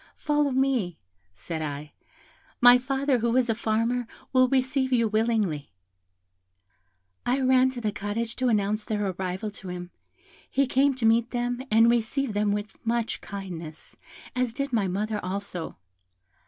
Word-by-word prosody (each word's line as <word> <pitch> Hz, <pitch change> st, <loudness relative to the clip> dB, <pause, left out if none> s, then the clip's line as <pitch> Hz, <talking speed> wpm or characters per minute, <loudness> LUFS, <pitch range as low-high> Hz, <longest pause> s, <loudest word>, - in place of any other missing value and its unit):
'Follow 295 Hz, -1 st, +1 dB
me,' 255 Hz, -10 st, +1 dB, 0.4 s
said 160 Hz, -, -5 dB
I; 145 Hz, 0 st, -5 dB, 0.7 s
'my 245 Hz, 0 st, +8 dB
father, 270 Hz, 0 st, 0 dB
who 235 Hz, +2 st, +1 dB
is 245 Hz, -2 st, +3 dB
a -, -, +2 dB
farmer, 230 Hz, +2 st, 0 dB, 0.3 s
will 255 Hz, 0 st, +5 dB
receive 260 Hz, 0 st, +1 dB
you 235 Hz, -3 st, +3 dB
willingly.' 215 Hz, -9 st, 0 dB, 1.5 s
I 255 Hz, +3 st, +1 dB
ran 260 Hz, 0 st, +4 dB
to 255 Hz, -2 st, -6 dB
the 215 Hz, -2 st, 0 dB
cottage 210 Hz, +3 st, -3 dB
to 255 Hz, -, +1 dB
announce 210 Hz, -1 st, +1 dB
their 210 Hz, -2 st, -2 dB
arrival 185 Hz, +3 st, -4 dB
to 195 Hz, -2 st, -11 dB
him; 180 Hz, 0 st, -6 dB, 0.6 s
he 275 Hz, +1 st, +2 dB
came 270 Hz, +1 st, +2 dB
to 250 Hz, -3 st, -2 dB
meet 230 Hz, +1 st, +4 dB
them, 245 Hz, 0 st, -2 dB
and 225 Hz, +2 st, +5 dB
received 235 Hz, +2 st, +1 dB
them 205 Hz, 0 st, +1 dB
with 205 Hz, +1 st, -4 dB
much 230 Hz, 0 st, -1 dB
kindness, 170 Hz, -6 st, -8 dB, 0.4 s
as 250 Hz, -2 st, 0 dB
did 275 Hz, +1 st, -3 dB
my 210 Hz, -4 st, +2 dB
mother 210 Hz, +3 st, -2 dB
also. 185 Hz, -, -5 dB
230 Hz, 150 wpm, -26 LUFS, 200-255 Hz, 1.5 s, my